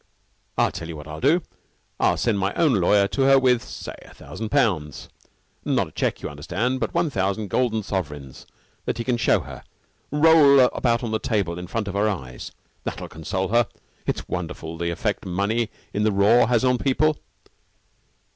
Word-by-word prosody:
"I'll - - +3
tell 80 - -7
you 85 - -6
what 75 0 -10
I'll 75 0 -7
do. 155 +7 +3 0.6
I'll - - +3
send 110 -4 +1
my 95 +1 -1
own 160 -6 +3
lawyer 100 0 +3
to 140 - -2
her 135 0 +6
with 125 -3 +3
say, - - -8
a - - -15
thousand 110 -1 -7
pounds 90 - 0 0.5
not - - 0
a - - -21
check, - - -2
you - - -2
understand, 110 - -2
but - - -3
one 170 -3 +1
thousand 100 0 -1
golden 115 -4 +1
sovereigns 75 -9 -5 0.4
that - - -2
he 115 - -2
can 125 0 0
show - - +3
her - - -10 0.5
roll 150 -2 +6
about 125 -1 +2
on 115 - -3
the 110 - 0
table 100 -7 -1
in 90 - -7
front 105 +2 -3
of 100 - -4
her 105 +2 +2
eyes. 65 -11 -6 0.3
That'll - - -5
console 95 +4 -3
her. 120 +2 +3 0.4
It's - - -2
wonderful, 85 -2 -5
the 85 +1 -2
effect 85 - -2
money 100 +5 -1 0.2
in 105 - -1
the 110 0 +3
raw 105 +4 +4
has 120 +1 +2
on 125 -1 +2
people." 150 +3 +1
110 Hz, 185 wpm, -23 LUFS, 90-125 Hz, 0.6 s, her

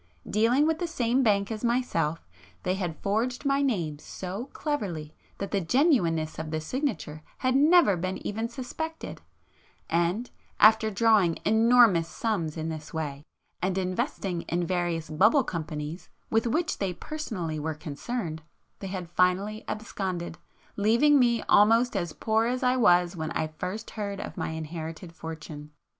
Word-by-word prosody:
Dealing 235 +7 +3
with 320 0 +1
the 350 - -1
same 250 -5 +1
bank 200 -3 +2
as 215 0 -5
myself, 170 - 0 0.4
they 185 - +1
had 180 -4 -3
forged 235 +7 -1
my 275 0 +2
name 175 - -1
so 190 +8 -6
cleverly 180 - -3 0.2
that 200 - -5
the 200 - +1
genuineness 170 - +2
of 160 0 -4
the 155 0 -2
signature 160 - -3 0.2
had 255 0 +1
never 300 - +6
been 185 +2 -3
even 225 +3 -2
suspected,—and, 245 - -5 0.3
after 220 +1 +6
drawing 205 -5 +3
enormous 220 -5 +5
sums 175 -4 -2
in 160 0 -3
this 155 -1 -6
way, 145 -3 -4 0.4
and 185 +1 0
investing 185 - -2
in 175 +1 0
various 175 -2 -1
'bubble' 215 - +4
companies 160 -1 -5 0.2
with 225 +1 +2
which 320 +8 0
they 195 -3 -1
personally 185 - -4
were 155 +1 -3
concerned, 160 - -4 0.4
they 195 - -5
had 185 -2 -5
finally 185 +5 +1
absconded, 190 -6 -4 0.4
leaving 235 +8 +4
me 235 -2 +3
almost 230 +4 +4
as 175 -4 -1
poor 220 +6 +1
as 255 +1 -1
I 250 0 +3
was 180 -7 +4
when 160 -2 -3
I - - 0
first 180 +8 -6
heard 200 -2 -4
of - - -6
my 165 - -3
inherited 160 +2 -6
fortune. 155 -2 -8
195 Hz, 150 wpm, -27 LUFS, 165-235 Hz, 0.4 s, never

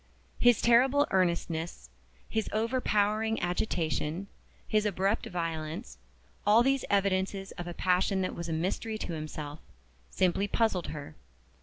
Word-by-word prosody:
His 245 -2 +5
terrible 260 +5 +5
earnestness, 170 - -1 0.4
his 220 -1 -1
overpowering 220 -1 +1
agitation, 175 -2 -1 0.4
his 215 -1 +2
abrupt 200 +1 0
violence 160 - -4 0.4
all 215 +3 +6
these 270 +1 +2
evidences 195 -1 +1
of 175 - -7
a 175 - -6
passion 185 +1 +2
that 185 - -2
was 170 0 -5
a - - -1
mystery 190 +7 -2
to 180 - -4
himself 155 -1 -6 0.5
simply 185 +2 +1
puzzled 205 -5 +1
her. 145 -2 -7
190 Hz, 125 wpm, -30 LUFS, 170-215 Hz, 0.5 s, all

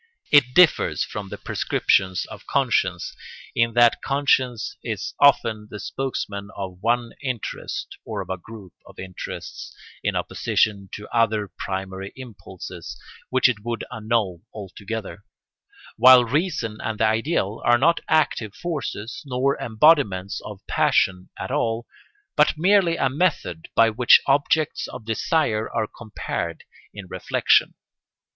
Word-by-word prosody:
It 130 -4 +5
differs 180 -3 +4
from 100 -2 -6
the - - -6
prescription 95 -1 +1
of - - -11
conscience, - - 0 0.4
in 115 0 +1
that 120 -1 +5
conscience 130 -4 +1
is - - -4
often 115 -7 +3
the 105 - -8
spokesman 105 -7 -4
of 95 -2 -6
one 120 +1 0
interest 125 -5 -4
or - - -5
of - - -7
a 95 - -2
group 100 -1 -12
of - - -16
interests 95 -1 -8 0.3
in - - 0
opposition 100 -3 0
to 105 - -7
other 110 -3 +1
primary 95 0 -6
impulses 95 -8 -9 0.3
which 130 0 +4
it 110 -4 -2
would 120 0 -3
annul 110 -6 -1
altogether; 105 +1 -7 0.7
while 130 -1 +8
reason 140 - -1
and 110 -1 -4
the 110 - +4
ideal 110 - 0
are 120 0 +5
not 165 +7 +3
active 120 -9 +1
forces 135 -9 -5
nor 135 +2 +1
embodiments 110 - +2
of 100 -2 -10
passion 90 0 +1
at - - -5
all, 115 +1 -1 0.5
but 150 +1 +3
merely 180 -1 +3
a 135 - +2
method 135 - -1
by 115 0 +5
which 120 +2 +6
objects 145 +2 +1
of 110 - -9
desire 115 -1 0
are 110 - 0
compared 110 0 -5 0.3
in 105 -2 -9
reflection. - - +2
115 Hz, 130 wpm, -23 LUFS, 100-135 Hz, 0.7 s, while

